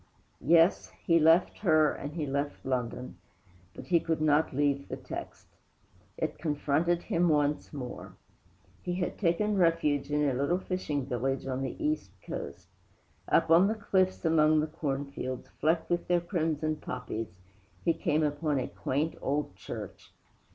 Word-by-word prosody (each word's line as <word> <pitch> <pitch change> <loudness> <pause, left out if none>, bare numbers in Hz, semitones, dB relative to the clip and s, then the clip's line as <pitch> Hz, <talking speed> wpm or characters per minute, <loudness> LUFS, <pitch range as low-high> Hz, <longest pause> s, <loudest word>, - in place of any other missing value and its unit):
VI 120 - -13
Yes, 165 +2 +5 0.2
he 165 -2 +5
left 165 +3 +4
her, 155 -6 +4
and 145 +2 -6
he 160 -2 -2
left 140 +1 -3
London; 125 -1 -3 0.6
but - - -9
he 170 -2 +3
could 160 0 -1
not 155 0 +3
leave 140 0 0
the - - -4
text. - - -8 0.7
It - - -3
confronted 160 +2 0
him 170 +1 +1
once 150 -1 +1
more. 130 -4 -7 0.7
He 175 -1 -3
had 180 -1 -3
taken 205 +3 +1
refuge 165 -5 +2
in 150 0 +2
a 135 - +1
little 140 +7 +1
fishing 180 -7 -3
village 135 +1 -2
on 130 0 -2
the 135 - -3
East 310 0 -2
Coast. - - -7 0.6
Up 165 - +3
on 175 +4 +7
the 220 - 0
cliffs, 185 -4 0
among 155 -1 +4
the 155 - +1
corn 145 -3 -3
fields, 130 -2 -6
flecked 160 +3 +1
with 175 - 0
their 175 0 +3
crimson 160 -3 -1
poppies, 125 -5 -5 0.6
he 170 - +4
came 155 0 0
upon 150 0 0
a 130 - -1
quaint 150 +5 -2
old 140 -8 -1
church. - - -8
155 Hz, 160 wpm, -30 LUFS, 140-170 Hz, 0.7 s, on